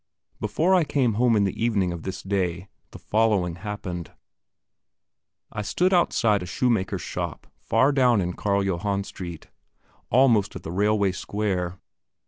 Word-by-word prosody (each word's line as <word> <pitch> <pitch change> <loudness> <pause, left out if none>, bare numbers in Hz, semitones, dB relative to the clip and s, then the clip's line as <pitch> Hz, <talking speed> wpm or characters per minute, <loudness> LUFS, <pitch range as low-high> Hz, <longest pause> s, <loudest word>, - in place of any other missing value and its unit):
Before 155 - +1
I 180 -3 +5
came 130 -6 +1
home 120 +2 +3
in 105 - +3
the 100 +3 -2
evening 100 -6 +1
of 85 -1 -5
this 95 +1 -6
day, 95 -2 -2 0.2
the - - -11
following 105 -6 +1
happened: 90 -3 -6 1.4
I 105 - -4
stood 180 - +1
outside 115 - +3
a 90 - -6
shoemaker's 100 -4 0
shop - - -5
far 130 +6 +2
down 125 -5 +3
in 90 -1 -1
Carl 100 +1 0
Johann 100 +1 -1
Street, 85 -4 -8 0.6
almost 115 -5 +3
at - - -7
the - - -6
railway 100 +1 +2
square. 95 -2 -2
100 Hz, 145 wpm, -25 LUFS, 90-115 Hz, 1.4 s, I